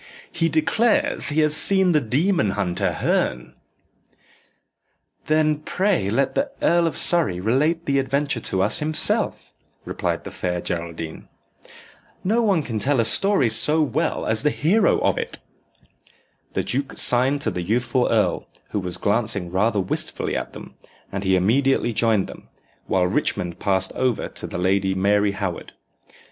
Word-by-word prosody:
"He 165 - 0
declares 240 - +1
he 155 +1 +1
has 150 0 +2
seen 190 +2 +3
the 150 -3 +3
demon 140 - +1
hunter, 95 -1 -1
Herne." 65 - -1 1.7
"Then 155 0 +2
pray 180 - 0
let 135 +5 0
the 275 +1 -1
Earl 170 0 +2
of 165 - -2
Surrey 160 - +3
relate 150 - 0
the 140 -1 +1
adventure 135 -1 -1
to 95 -4 -1
us 105 - +1
himself," 155 +1 -1 0.3
replied - - -3
the - - -8
Fair 90 -1 -3
Geraldine. 85 -2 -6 1.0
"No 220 +5 +1
one 195 -8 +1
can 115 -5 -4
tell 135 +5 +1
a 115 - +2
story 195 - +3
so 150 +8 +4
well 150 +3 -1
as 110 0 -1
the 150 - +2
hero 185 +9 +2
of - - +1
it." - - -4 1.2
The - - -1
duke 135 +2 -3
signed 130 +4 +3
to 110 - -1
the 90 - -4
youthful 120 +6 0
earl, - - 0 0.2
who 105 - -1
was 90 -2 0
glancing 100 -2 -1
rather 105 +3 +1
wistfully 95 - -3
at - - -4
them, - - -11 0.4
and 100 0 -4
he 95 -1 +2
immediately 120 +6 +1
joined 110 -3 +2
them, - - -12 0.4
while 90 -1 +1
Richmond 90 -1 -2
passed 95 -2 0
over 130 -3 -1
to - - -7
the - - -6
Lady 95 +1 +1
Mary 100 +1 +2
Howard. 100 -4 -5
120 Hz, 155 wpm, -22 LUFS, 95-155 Hz, 1.7 s, so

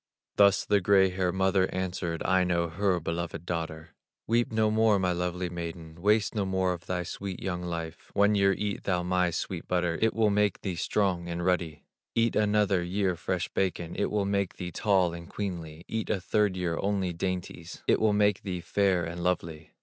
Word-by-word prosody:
'" - - -64
Thus 100 -2 +5
the 100 -1 +3
gray 95 0 +4
haired 90 -1 -1
mother 95 0 +2
answered 90 -2 -3
Aino, 90 -2 +2
her 95 +1 +1
beloved 85 0 -4
daughter: 80 -2 -4 0.3
"Weep 120 +1 +1
no 110 -1 +2
more, 110 -1 +4
my 90 -1 +1
lovely 90 +1 -2
maiden, 85 -1 -7
Waste 105 +2 +3
no 105 -3 0
more 95 -1 0
of 85 -1 -10
thy 90 -1 -1
sweet 95 +2 -6
young 90 -2 -3
life; 85 -2 -5
One 100 +1 +4
year 100 -1 +4
eat 100 +1 -3
thou 90 -2 +1
my 90 0 +2
sweet 85 +1 -4
butter, 90 -2 0
It 110 0 +2
will 110 -2 +3
make 105 0 +1
thee 95 - -2
strong 90 -1 0
and 85 0 -3
ruddy; 85 -4 0 0.3
Eat 115 0 +2
another 105 -3 +2
year 90 +1 0
fresh 90 +1 -2
bacon, 90 -3 -2
It 100 - 0
will 105 -1 0
make 100 -2 -1
thee 90 -1 -5
tall 95 -3 +2
and 85 0 -9
queenly; 85 -5 -5
Eat 110 0 -3
a 105 - +1
third 100 +1 +1
year 85 -2 -1
only 95 -3 0
dainties, 85 -1 -5
It - - +3
will 110 -1 +4
make 105 -1 +2
thee 95 -3 -4
fair 95 0 +1
and 85 +1 -5
lovely. 85 -3 -2
90 Hz, 195 wpm, -28 LUFS, 85-100 Hz, 0.3 s, Thus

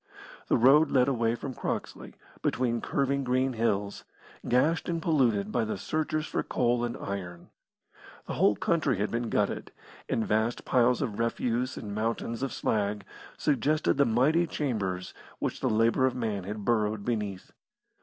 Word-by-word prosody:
The - - +3
road 140 +6 +6
led 125 -1 +3
away 115 -4 +1
from 130 +2 -6
Croxley, - - -5 0.3
between 120 -2 0
curving 140 0 0
green 130 +1 +1
hills, 105 -3 -1 0.5
gashed 150 +10 +2
and 170 -1 -1
polluted 120 -11 +1
by 120 - +1
the 110 - -3
searchers 155 0 -2
for - - -2
coal 120 -1 0
and 120 -1 -3
iron. 90 -3 -6 0.7
The - - -5
whole 105 - +3
country 155 - +1
had 105 +2 -1
been 115 0 -2
gutted, - - -1 0.4
and 115 - 0
vast 110 +2 0
piles 125 +2 +3
of 110 -6 -4
refuse 120 +2 -1
and 105 -2 -6
mountains 115 +2 -2
of 135 -2 -2
slag 105 -2 -1 0.3
suggested 150 +1 +1
the 140 - +5
mighty 145 +9 +3
chambers 100 - -2 0.2
which - - -3
the - - 0
labour 115 +4 +3
of 130 - -2
man 110 -6 -2
had 105 +1 -5
burrowed 105 -2 +1
beneath. 105 -5 -3
120 Hz, 155 wpm, -28 LUFS, 105-135 Hz, 0.7 s, road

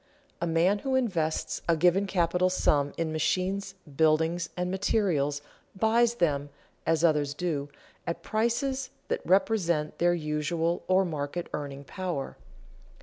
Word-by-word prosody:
_ - - -37 0.4
A 170 - 0
man 170 +5 +3
who 265 +4 -1
invests 165 -10 0
a 165 - +4
given 180 +4 +3
capital 180 -1 +2
sum 145 -5 +2
in 165 -1 -1
machines, 190 +5 -1 0.2
buildings, 160 +3 +2
and 180 0 -1
materials 165 -8 0 0.3
buys 230 +3 +3
them, 145 -8 0 0.4
as 165 0 +2
others 150 -3 +2
do, 145 -4 -2 0.4
at 170 - -3
prices 260 +4 0 0.2
that - - -1
represent 180 -5 +1
their 175 0 +3
usual, 160 +2 -1
or 185 +1 +4
market, 155 +1 -4
earning 140 -1 -5
power. 175 -3 -4
170 Hz, 135 wpm, -28 LUFS, 155-190 Hz, 0.4 s, a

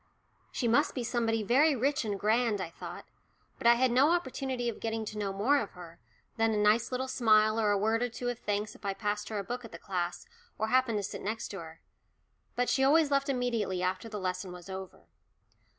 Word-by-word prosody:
"She 245 - -1
must 240 +6 +3
be 250 - -2
somebody 225 -1 0
very 275 +8 +4
rich 275 +3 +1
and 205 -2 -2
grand," 220 0 +2
I 170 -3 -4
thought. - - -8 0.5
But - - +1
I 235 - +8
had 255 +1 +2
no 265 +5 +5
opportunity 265 -7 -1
of 235 - -3
getting 225 -1 -2
to 215 - -6
know 200 -2 -1
more 230 +9 +2
of 215 - -5
her, 170 -2 -12 0.4
than 225 -1 +2
a - - 0
nice 210 +4 +3
little 255 +1 -2
smile 215 -3 +3
or 215 -2 +2
a 205 - +3
word 220 +3 +1
or 245 - 0
two 245 +1 -5
of 245 - -4
thanks 210 0 -2
if - - -18
I 200 -1 -2
passed 210 0 -2
her 215 - -3
a 200 - -2
book 245 +4 -5
at 230 - -10
the - - -8
class 175 -2 -3 0.3
or 220 +1 -1
happened 255 -3 +3
to 205 - -2
sit - - -5
next 220 +3 -4
her. 165 -5 -9 0.7
For 245 - +1
she 265 - +1
always 295 +2 +4
left 275 0 +2
immediately 235 -8 -1
after 185 +5 -2
the 215 - -5
lesson 185 0 -3
was 180 +1 -10
over. 190 0 -8
225 Hz, 225 wpm, -30 LUFS, 205-245 Hz, 0.7 s, I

